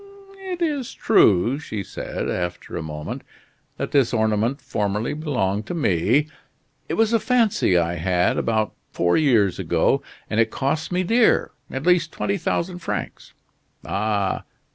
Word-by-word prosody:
"It 355 -1 -2
is 290 -6 -2
true," 120 - +4
she 110 -9 -5
said, - - -5
after 90 -1 -4
a - - -2
moment, 75 -1 -6 0.6
"that - - -3
this 130 -4 +3
ornament 110 +4 +1
formerly 105 -2 -2
belonged 115 - -1
to 175 - -3
me. 120 - +2 0.6
It - - 0
was 225 0 +2
a 230 - +4
fancy 225 - +2
I 85 0 0
had, 90 +1 +1
about 110 -2 0 0.2
four 85 0 +1
years 115 - +3
ago, - - +2 0.3
and 110 - -1
it 115 -1 +4
cost 145 +8 -2
me 180 +1 +1
dear 230 +5 +3 0.2
at 135 +3 -5
least 175 -2 +3
twenty 200 0 -1
thousand 175 +1 -2
francs. 170 - -5 0.5
Ah! 100 -1 -1
115 Hz, 145 wpm, -23 LUFS, -, 0.6 s, true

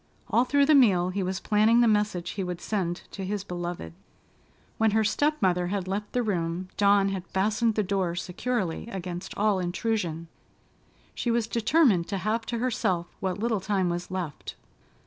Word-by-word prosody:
All 245 - +4
through 285 +2 +3
the 305 - +5
meal, 195 -10 +5
he 195 +2 -2
was 185 +1 -2
planning 220 +3 +3
the 240 - +5
message 210 -5 +1
he 195 - -3
would 180 -1 -4
send 180 -4 -2
to 195 - -6
his 200 +1 -3
beloved. 175 - -5 0.9
When 225 0 +4
her 220 - +3
step 295 +8 +1
mother 180 -1 +2
had 190 0 -2
left 205 +2 -3
the 245 - +1
room, 180 -3 -2
Dawn 200 -1 +4
had 190 -2 -4
fastened 215 +3 +1
the 215 - +1
door 185 -3 -1
securely 190 +1 -2
against 180 -5 -6
all 205 -2 +2
intrusion. 175 -3 -2 0.9
She 240 - -2
was 235 -1 +2
determined 230 - +3
to 200 - -2
have 215 +4 -1
to 235 - -2
herself 190 -8 -1
what 185 -2 -2
little 220 -1 0
time 190 -2 0
was 175 +1 -3
left. 180 -6 -5
195 Hz, 175 wpm, -27 LUFS, 180-220 Hz, 0.9 s, the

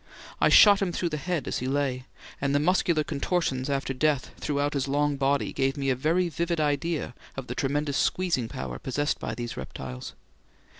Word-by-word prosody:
I - - +4
shot 205 -2 +8
him 190 -2 0
through 175 0 -1
the 155 - -3
head 175 0 -2
as - - -1
he 125 - -3
lay, 135 -2 -1 0.4
and 140 0 +1
the - - +4
muscular 170 -1 +2
contortions 145 -3 -1
after 135 -1 -1
death 145 0 0
throughout 145 0 -1
his 140 -1 -1
long 145 +1 +1
body 140 +1 0
gave 135 0 0
me 135 -1 0
a - - +1
very 165 +7 +1
vivid 170 0 -1
idea 150 -1 -1 0.2
of 135 - -4
the 125 - -5
tremendous 145 +2 -1
squeezing 170 -10 +1
power 65 - -6
possessed 145 +3 -1
by - - -4
these 120 -1 -5
reptiles. 65 -1 -7
145 Hz, 190 wpm, -27 LUFS, 135-160 Hz, 0.4 s, shot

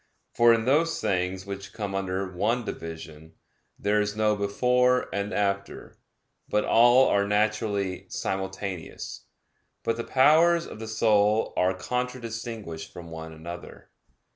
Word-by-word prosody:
For 120 0 +6
in 115 -1 +2
those 155 +6 +2
things 95 0 -1
which 100 0 -7
come 105 -3 -4
under 95 0 -2
one 105 +7 -1
division, 80 -2 -8 0.4
there 105 +1 +1
is 105 0 -2
no 105 -1 +2
before 125 +5 +2
and 100 +1 -2
after, 100 -1 -2 0.5
but 105 - +1
all 120 +3 +6
are 100 0 +2
naturally 105 -2 0
simultaneous. 95 -2 -5 0.6
But 115 0 0
the 115 - -3
powers 165 +7 +4
of - - -10
the 110 - -6
soul 110 -1 +2
are 90 +1 +2
contradistinguished 115 -4 -5
from 85 -1 -10
one 80 0 -7
another. 85 +2 -10
105 Hz, 130 wpm, -26 LUFS, 95-115 Hz, 0.6 s, For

